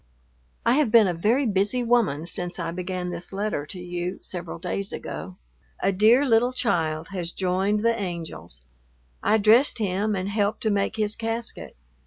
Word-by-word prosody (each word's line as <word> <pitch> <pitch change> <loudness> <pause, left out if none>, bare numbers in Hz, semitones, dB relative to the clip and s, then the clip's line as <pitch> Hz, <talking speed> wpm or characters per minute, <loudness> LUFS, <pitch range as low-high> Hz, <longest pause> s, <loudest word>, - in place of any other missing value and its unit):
I 235 - +5
have 290 -8 +2
been 225 -3 +7
a 180 - 0
very 225 +11 +2
busy 210 +4 +1
woman 225 -11 +2
since 175 +1 -4
I 165 -2 -3
began 180 0 -4
this 175 +1 -7
letter 195 -7 -2
to 185 - -7
you 180 +1 -4
several 175 -2 -6
days 195 +4 -3
ago. 185 -1 -6 0.4
A 195 - +2
dear 220 +8 +5
little 240 +1 +3
child 165 -10 -1
has 180 -3 -4
joined 195 +4 0
the 230 - +4
angels. 170 - -6 0.6
I 220 - +3
dressed 220 +6 +4
him 205 0 0
and 185 0 -2
helped 205 +1 0
to 220 - +1
make 200 -1 0
his 215 -1 0
casket. 230 0 -5
195 Hz, 170 wpm, -25 LUFS, 180-220 Hz, 0.6 s, been